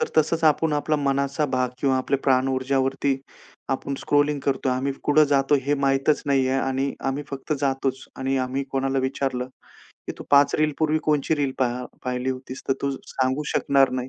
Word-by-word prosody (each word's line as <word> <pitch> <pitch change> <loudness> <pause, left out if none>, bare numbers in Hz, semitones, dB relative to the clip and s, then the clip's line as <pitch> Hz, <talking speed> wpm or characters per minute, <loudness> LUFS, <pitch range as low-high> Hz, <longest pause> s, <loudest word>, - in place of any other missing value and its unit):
तर 470 - 0
तसंच 160 +1 +2
आपण 155 0 +3
आपला 150 +1 +1
मनाचा 140 +1 0
भाग 130 -2 0
किंवा 135 -2 +2
आपले 135 +2 0
प्राण 130 0 +3
ऊर्जावरती 135 +1 0 0.5
आपण 135 +1 -2
स्क्रॉलिंग 145 0 +2
करतोय. 135 -1 0
आम्ही 135 +2 -1
कुठं 150 +1 +5
जातो 135 +1 +3
हे 145 +2 +1
माहीतच 135 +2 +2
नाहीये 135 -2 +2
आणि 135 +1 -1 0.2
आम्ही 140 +2 -2
फक्त 140 +2 -4
जातोच. 135 -1 -1
आणि 135 0 -1
आम्ही 135 +2 -3
कोणाला 135 0 0
विचारलं, 130 -1 -2 0.6
की - - -3
तू - - -8
5 140 0 +5
रील 155 -1 +2
पूर्वी 155 0 +2
कोणची 150 0 +1
रील 140 -2 0
पाह 125 -1 0 0.2
पाहिली 125 +1 -1
होतीस, 130 0 -7
तर - - +4
तू 140 - +1 0.2
सांगू 130 +2 -1
शकणार 135 -1 +3
नाही. 130 0 -3
135 Hz, 180 wpm, -24 LUFS, 130-145 Hz, 0.6 s, कुठं